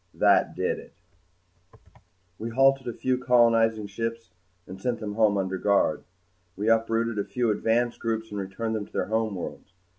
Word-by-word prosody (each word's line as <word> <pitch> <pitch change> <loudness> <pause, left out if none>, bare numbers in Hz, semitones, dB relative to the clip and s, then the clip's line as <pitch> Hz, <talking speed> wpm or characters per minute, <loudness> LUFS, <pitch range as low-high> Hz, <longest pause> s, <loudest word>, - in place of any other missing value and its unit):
That - - +3
did - - -1
it. - - -14 1.5
We 115 - -4
halted 135 +2 +3
a 120 - -2
few 130 -1 0
colonizing 115 -3 +3
ships 115 +1 -5 0.3
and 95 +1 -10
sent 120 0 -1
them 105 -2 -5
home 105 -1 +3
under 95 -1 -2
guard. 100 -6 +2 0.5
We 105 +3 0
uprooted 115 0 +1
a - - +1
few 120 -3 +1
advance 115 +3 0
groups 110 -1 -3
and 105 - -4
returned 100 +4 -4
them 105 -2 -4
to - - -25
their - - -1
homeworlds. 110 -6 -3
115 Hz, 160 wpm, -26 LUFS, 105-115 Hz, 1.5 s, That